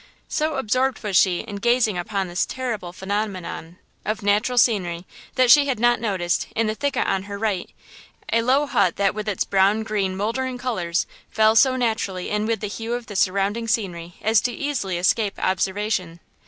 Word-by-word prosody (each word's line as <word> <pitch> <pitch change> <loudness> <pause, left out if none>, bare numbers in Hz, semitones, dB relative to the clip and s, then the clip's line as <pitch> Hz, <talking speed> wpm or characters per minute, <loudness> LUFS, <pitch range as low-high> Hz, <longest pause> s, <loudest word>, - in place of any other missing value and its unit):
So 310 0 -1
absorbed 260 +1 0
was 205 -3 -2
she 180 -1 +4
in 205 -3 -7
gazing 235 -1 +2
upon 190 +2 -2
this 175 +1 -1
terrible 235 -9 -4
phenomenon 190 -3 -4 0.3
of 215 -1 -3
natural 210 +5 +1
scenery 185 -7 +2 0.3
that 255 -2 +5
she 290 +1 +7
had 260 -5 -1
not 240 -1 +3
noticed, 185 -6 -1
in 225 - +1
the 215 - 0
thicket 280 +2 -1
on 195 0 -1
her 200 - -4
right, 200 -4 -2 0.6
a 230 - +4
low 265 +5 +3
hut 200 -10 +2
that, 200 -1 +1
with 215 0 -4
its 200 - 0
brown 200 +3 +2
green 200 -3 -1
moldering 250 +5 -2
colors, 185 -9 -1 0.2
fell 220 0 +3
so 260 +2 +5
naturally 220 -7 -2
in 210 +1 0
with 225 -3 -1
the 210 - -2
hue 225 +4 -4
of 245 -1 -5
the 205 - -9
surrounding 200 +4 +1
scenery 175 -6 -2
as 220 0 +4
easily 245 -6 -3
to 175 - -2
escape 205 +2 +1
observation. 190 -2 -1
210 Hz, 180 wpm, -23 LUFS, 190-235 Hz, 0.6 s, she